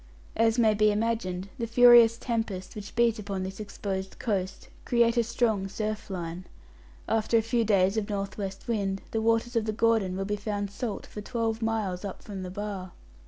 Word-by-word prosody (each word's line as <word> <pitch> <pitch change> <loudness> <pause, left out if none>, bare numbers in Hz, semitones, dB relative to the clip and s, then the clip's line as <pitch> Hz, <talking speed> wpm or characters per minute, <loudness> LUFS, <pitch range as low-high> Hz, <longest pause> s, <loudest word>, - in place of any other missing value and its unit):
As 225 +1 +3
may 220 -3 +5
be 215 0 +4
imagined, 205 -4 -1
the 230 - -1
furious 235 -1 +7
tempests 225 -6 -3
which 205 -1 -8
beat 235 -1 +3
upon 195 -2 -3
this 190 +2 -6
exposed 195 -2 -5
coast 195 -5 -2 0.2
create 235 -1 +3
a 235 - +3
strong 225 -4 0
surf 215 +2 -4
line. 175 -1 -5 0.6
After 225 +1 +2
a 225 - +2
few 230 +1 +1
days 195 -1 +3
of 215 -1 -1
north 200 -1 -3
west 195 -2 -6
wind 195 -4 -1
the 225 - 0
waters 230 +2 +1
of 225 -2 +2
the 215 - 0
Gordon 215 -4 +1
will 195 - -2
be 205 +1 -1
found 205 -1 -3
salt 215 0 -4
for 210 - -8
twelve 225 0 -2
miles 215 -5 -1
up 200 -2 -6
from 200 -3 -6
the 185 - -5
bar. 195 -2 -5
210 Hz, 190 wpm, -28 LUFS, 195-230 Hz, 0.6 s, furious